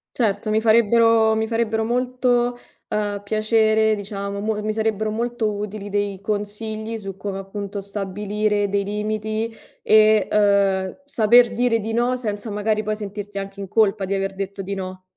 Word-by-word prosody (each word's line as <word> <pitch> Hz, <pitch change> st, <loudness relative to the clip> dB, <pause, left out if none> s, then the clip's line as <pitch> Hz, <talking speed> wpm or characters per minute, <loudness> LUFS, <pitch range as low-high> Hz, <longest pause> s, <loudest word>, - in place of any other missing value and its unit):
Certo, 215 Hz, -2 st, 0 dB
mi 215 Hz, +1 st, +2 dB
farebbero 225 Hz, 0 st, +4 dB
mi 220 Hz, 0 st, 0 dB
farebbero 225 Hz, -1 st, 0 dB
molto, 245 Hz, 0 st, +1 dB, 0.3 s
uhm, 205 Hz, -1 st, -2 dB
piacere, 220 Hz, +1 st, +2 dB
diciamo, 200 Hz, 0 st, -5 dB
mo 215 Hz, +1 st, -1 dB
mi 215 Hz, 0 st, -1 dB
sarebbero 220 Hz, -1 st, -1 dB
molto 235 Hz, 0 st, -1 dB
utili 205 Hz, 0 st, -5 dB
dei 205 Hz, -1 st, -1 dB
consigli 215 Hz, +2 st, -3 dB
su 195 Hz, -3 st, -7 dB
come, 195 Hz, -1 st, -4 dB
appunto, 200 Hz, +1 st, -5 dB
stabilire 205 Hz, +1 st, -1 dB
dei 200 Hz, 0 st, 0 dB
limiti 215 Hz, +2 st, -3 dB, 0.3 s
e, 215 Hz, -1 st, +5 dB
uhm, 200 Hz, +1 st, +2 dB
saper 240 Hz, -2 st, +4 dB
dire 235 Hz, 0 st, +2 dB
di 225 Hz, +1 st, -4 dB
no 245 Hz, +2 st, +1 dB
senza 215 Hz, -2 st, -4 dB
magari 210 Hz, +1 st, 0 dB
poi 215 Hz, 0 st, -2 dB
sentirti 205 Hz, -1 st, -7 dB
anche 195 Hz, 0 st, -6 dB
in 195 Hz, -, -5 dB
colpa 205 Hz, -1 st, +2 dB
di 195 Hz, +1 st, -1 dB
aver 195 Hz, 0 st, -2 dB
detto 195 Hz, 0 st, -5 dB
di 195 Hz, +1 st, -4 dB
no. 185 Hz, -1 st, -6 dB
215 Hz, 160 wpm, -22 LUFS, 200-220 Hz, 0.3 s, e